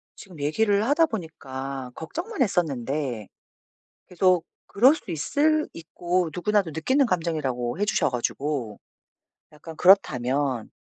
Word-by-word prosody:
지금 180 -5 -13
얘기를 200 +8 +1
하다 295 +6 +4
보니까 135 - -6
걱정만 340 - -5
했었는데 140 - -1 0.8
계속 180 -2 +2 0.2
그럴 255 +9 +5
수 220 - -9
있을 305 - +1
있고 175 +1 -2
누구나도 200 -1 0
느끼는 260 - +2
감정이라고 155 - -2
해 205 - +2
주셔 - - +1
가지고 125 -2 -3 0.7
약간 160 +2 -11
그렇다면 135 - +3
165 Hz, 275 characters per minute, -25 LUFS, 135-205 Hz, 0.8 s, 그럴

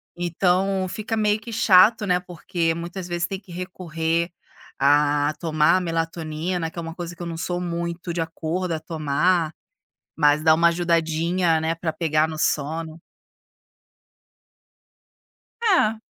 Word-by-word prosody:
Então, 185 +2 +1
fica 220 +3 -3
meio 210 0 +2
que 230 +1 -9
chato, 210 +1 +5
né, 180 0 +3
porque 170 -1 -2
muitas 175 +2 -6
vezes 175 -1 -1
tem 195 -1 -5
que 190 -3 -17
recorrer 170 -2 -2 0.5
a 145 +1 +3
tomar 160 +2 +3
melatonina, 165 0 -2
que - - -18
é - - -2
uma 165 0 -7
coisa 175 -1 -6
que 175 - -12
eu 170 - -4
não 165 -1 -5
sou 175 +1 -2
muito 170 0 -4
de 165 - -1
acordo 165 +2 -3
a 160 - -2
tomar. 160 +2 0 0.7
Mas 150 0 +4
dá 160 -1 +6
uma 170 +1 +4
ajudadinha, 170 0 +1
né, 160 +1 0
pra 165 -1 -3
pegar 155 -1 +1
no 155 -1 -6
sono. 160 +2 -1 2.6
É. 225 - +3
170 Hz, 140 wpm, -23 LUFS, 160-180 Hz, 2.6 s, dá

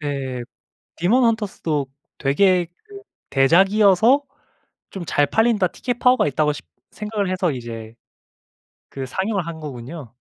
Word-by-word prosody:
네 135 -4 -3 0.6
데몬 235 +9 +3
헌터스도 195 -10 -1 0.3
되게 175 +5 +3 0.2
그 405 -2 -12 0.3
대작이어서 195 - +4 0.7
좀 185 -3 -7
잘 145 - +2
팔린다 220 +1 +2
티켓 245 +6 -4
파워가 250 -4 +4
있다고 150 +1 +1
싶 145 - -8 0.3
생각을 210 -2 -3
해서 185 -3 0
이제 115 -3 -7 1.0
그 135 -1 -6
상영을 190 - -2
한 160 -1 -6
거군요. 130 -2 -8
175 Hz, 255 characters per minute, -21 LUFS, 140-210 Hz, 1.0 s, 대작이어서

